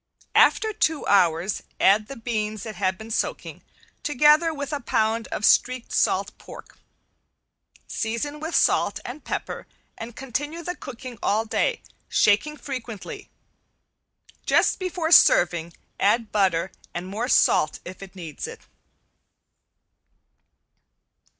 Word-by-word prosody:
After 440 -1 +4
two 320 -7 0
hours 180 -1 +2 0.2
add 210 +2 +4
the 275 - -8
beans 215 -3 -3
that 220 - -6
have 190 -2 -1
been 220 +2 -10
soaking, - - -3 0.4
together 300 +3 +4
with 285 -1 -5
a 290 - -1
pound 225 -2 0
of 215 - -2
streaked 255 -1 +3
salt - - +1
pork. - - -13 1.1
Season 235 +7 -3
with 320 +2 -4
salt - - +2
and 260 +5 -8
pepper - - -5 0.3
and 225 +1 -8
continue 290 +6 -4
the 355 +2 -4
cooking 255 -5 -9
all 215 +2 +1
day, 465 - -1 0.3
shaking 260 +9 +2
frequently. 250 -7 -7 1.2
Just - - +3
before 355 -3 -2
serving 170 - +5 0.3
add 220 +2 +2
butter 190 -3 +1 0.2
and 175 +1 -4
more 210 +6 -3
salt 155 -10 +3
if 185 +2 -9
it 195 0 -11
needs 165 -5 -7
it. - - -10
230 Hz, 120 wpm, -24 LUFS, 200-290 Hz, 1.2 s, serving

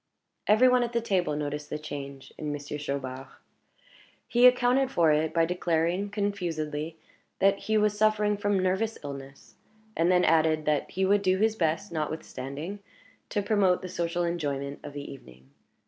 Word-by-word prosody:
Every 215 +5 +6
one 250 0 +4
at 240 -1 -2
the 235 - +2
table 185 -9 0
noticed 150 0 -4
the - - -3
change 140 -3 -8
in 150 -1 -4
Monsieur 145 0 -5
Chaubard. 135 -2 -4 1.0
He 245 +1 +6
accounted 250 +1 +3
for 170 -11 +3
it 155 +1 +1
by 165 -1 +3
declaring, 175 +2 0
confusedly, 165 -7 -3 0.4
that 195 0 +3
he 220 0 0
was 210 -1 +2
suffering 210 0 +2
from 205 0 0
nervous 190 +4 0
illness; 140 -1 -9 0.4
and 170 +2 +2
then 180 0 +4
added 155 -1 +3
that 150 -2 0
he 190 +2 0
would 200 +1 +3
do 185 -1 +2
his 220 +2 +2
best, 170 +2 -1
notwithstanding, 155 +2 -5 0.5
to 205 - -1
promote 195 -4 +2
the 185 - -5
social 175 -1 -1
enjoyment 145 -5 -3
of 145 - -9
the 145 0 -6
evening. 65 - -16
170 Hz, 165 wpm, -28 LUFS, 150-205 Hz, 1.0 s, Every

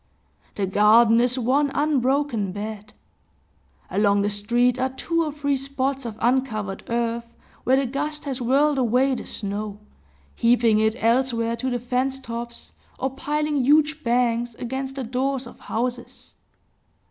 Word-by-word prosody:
The 200 - 0
garden 220 +4 +5
is 250 +1 +1
one 265 +4 +2
unbroken 275 -7 +1
bed. 210 +1 -7 1.0
Along 200 +1 +3
the 205 - 0
street 240 +5 +1
are 260 +1 +1
two 335 +5 -1
or 305 - -2
three 285 -1 -1
spots 270 0 -2
of 220 -2 -7
uncovered 230 -5 0
earth, 235 0 -1 0.4
where 260 - +4
the 275 - +1
gust 295 +4 -4
has 270 -2 -4
whirled 275 +4 +3
away 255 +2 +2
the - - -5
snow, 205 0 -4 0.5
heaping 230 -2 +3
it 220 0 +2
elsewhere 230 0 +1
to 260 +3 -2
the 245 - -1
fence 250 +2 -1
tops, 235 -1 -7 0.3
or 265 - -2
piling 295 +1 -1
huge 305 +3 +3
banks 235 -1 +1
against 265 +3 -4
the 270 - -3
doors 260 +2 -1
of 240 - -12
houses. 240 +1 -4
245 Hz, 145 wpm, -23 LUFS, 230-270 Hz, 1.0 s, garden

